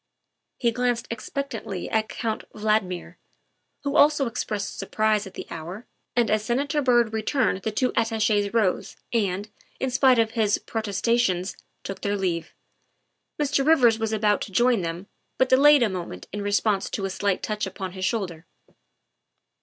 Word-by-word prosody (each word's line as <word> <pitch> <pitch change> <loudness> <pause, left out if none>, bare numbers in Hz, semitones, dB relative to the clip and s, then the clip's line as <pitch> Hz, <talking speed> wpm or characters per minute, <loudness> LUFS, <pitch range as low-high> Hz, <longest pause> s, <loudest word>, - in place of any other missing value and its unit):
He 235 -2 +2
glanced 245 0 0
expectantly 230 -5 -4
at 220 0 0
Count 225 -2 -3
Valdmir, 195 -5 -1 0.7
who 280 0 -2
also 295 -2 +5
expressed 210 -4 -3
surprise 215 +1 +1
at 190 - -13
the - - -6
hour, 170 +7 -7 0.3
and 240 -2 +2
as 215 0 +2
Senator 280 +6 0
Byrd 240 -4 +3
re 220 - -1
turned 235 -5 +1
the 220 - -1
two 250 +4 0
Attaches 220 -3 +1
rose 215 -5 0 0.2
and, 200 -3 0 0.3
in 265 - -1
spite 260 0 +5
of 225 -1 +2
his 215 -3 +2
protes 215 -4 -4
tations, 195 -6 +1 0.3
took 195 - -6
their 205 0 0
leave. 175 -4 -2 0.8
Mr. 290 -1 +1
Rivers 250 -7 +5
was 220 -1 -1
about 210 -1 +2
to - - -5
join 240 +1 +3
them, 170 +2 -4 0.3
but 260 - +2
delayed 285 +1 +7
a - - +4
moment 170 - -6
in 205 - -3
response 205 0 +1
to 195 - -3
a 195 - -3
slight 200 0 -1
touch 210 -1 -2
upon 190 -1 -6
his 185 0 -7
shoulder. 180 -6 -2
215 Hz, 160 wpm, -25 LUFS, 195-240 Hz, 0.8 s, delayed